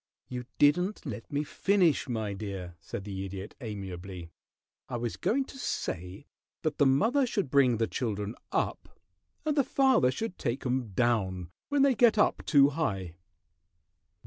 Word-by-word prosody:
"You 125 -1 -5
didn't 180 +8 +3
let 110 0 -6
me 145 +1 0
finish, 175 -3 +2
my 110 -4 -2
dear," 95 -3 -6
said 90 +3 -6
the 95 -1 -5
Idiot, 95 +1 -6
amiably. 95 -5 -6 0.6
"I 120 - -2
was 120 -1 -3
going 270 +4 +1
to 270 - -11
say 90 - -4 0.4
that 155 -2 -1
the 145 - +6
mother 230 - +3
should 200 - -1
bring 130 -4 +4
the 115 - +2
children 105 -3 -3 0.2
up, - - -2 0.5
and 305 -1 +1
the 280 - +4
father 260 - +4
should 185 - -4
take 125 +1 -2
'em 125 -1 0
down 95 -6 0 0.2
when 285 -1 +3
they 275 -1 +5
get 230 -1 +4
up 210 - +3
too 140 -2 +6
high." 95 - -2
125 Hz, 155 wpm, -29 LUFS, -, 0.6 s, the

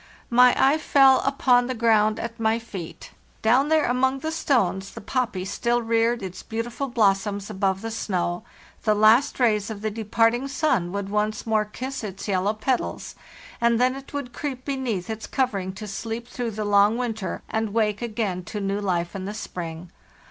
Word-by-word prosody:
My 250 +1 +6
eye 280 +4 +4
fell 270 -3 +5
upon 250 -3 +3
the 255 - -3
ground 220 -2 +3
at 230 0 -6
my 220 0 +2
feet. 195 -7 -8 0.3
Down 255 +6 +4
there 315 -1 +3
among 260 +2 +1
the 315 - -2
stones, 200 - 0
the - - -6
poppy 230 -4 -2
still 235 +4 0
reared 230 0 +1
its 185 -1 -6
beautiful 235 +4 -4
blossoms 205 -3 +1
above 190 -1 0
the 225 0 -4
snow; 180 -4 -2 0.4
the 215 -1 +2
last 220 +8 +4
rays 215 -4 +2
of 210 -2 -6
the 215 0 -2
departing 230 +4 +1
sun 270 - 0
would 200 0 -3
once 210 +1 -1
more 220 -1 +1
kiss 255 +5 -6
its 195 -1 -6
yellow 200 +2 +1
petals, 245 +4 -2 0.5
and 235 -1 +3
then 255 +1 +3
it 270 0 -10
would 280 -4 -5
creep 260 -2 -5
beneath 255 -10 -2
its 220 0 -5
covering 200 -8 -1
to 210 +3 -8
sleep 225 +4 -5
through 245 -1 -4
the 215 -1 -4
long 205 +2 +4
winter, 225 -6 -3
and 220 0 -1
awake 210 0 0
again 210 -6 -2
to 210 - -5
new 200 0 -1
life 175 -3 -1
in 190 -1 -4
the 205 +2 -5
spring. 170 -4 -6
225 Hz, 180 wpm, -24 LUFS, 200-245 Hz, 0.5 s, My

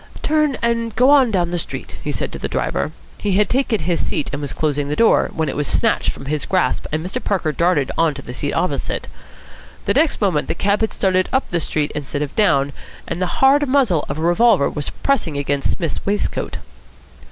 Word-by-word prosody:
"Turn 305 -4 +2
and 230 -1 0
go 255 +4 +5
on 275 -4 +6
down 175 -5 0
the 175 - -1
street," - - -6
he - - -2
said - - -3
to - - -7
the - - -3
driver. - - -1 0.3
He 205 -2 0
had 210 +2 +3
taken 250 -6 +1
his 170 +2 0
seat - - -2
and 145 - -3
was 145 - -3
closing 145 -2 -1
the 150 - -1
door, 230 +5 +4
when 160 -1 -2
it 135 - -3
was 145 -1 -1
snatched - - +1
from - - -5
his 150 +1 -2
grasp 185 -2 0
and 155 +2 -2
Mr. 185 - -4
Parker 180 -6 0
darted 165 -4 +1
on 165 -3 +2
to 140 - -8
the 125 - -8
seat 145 +3 -2
opposite. 180 - -2 0.8
The - - +2
next 320 - +2
moment 180 -8 +1
the - - -1
cab 200 +3 +1
had 220 - +1
started 185 -1 +1
up 265 - +1
the 175 - +1
street 150 -1 -1
instead 145 0 -3
of 145 - -7
down 145 -10 +2 0.3
and 175 - -4
the 180 +7 -1
hard 285 +2 +5
muzzle 250 - +3
of 140 - -3
a - - -4
revolver 175 -1 +3
was 145 - -2
pressing 180 - -1
against 140 0 0
Psmith's 165 -5 -3
waistcoat. 205 +1 -2
175 Hz, 220 wpm, -20 LUFS, 150-220 Hz, 0.8 s, on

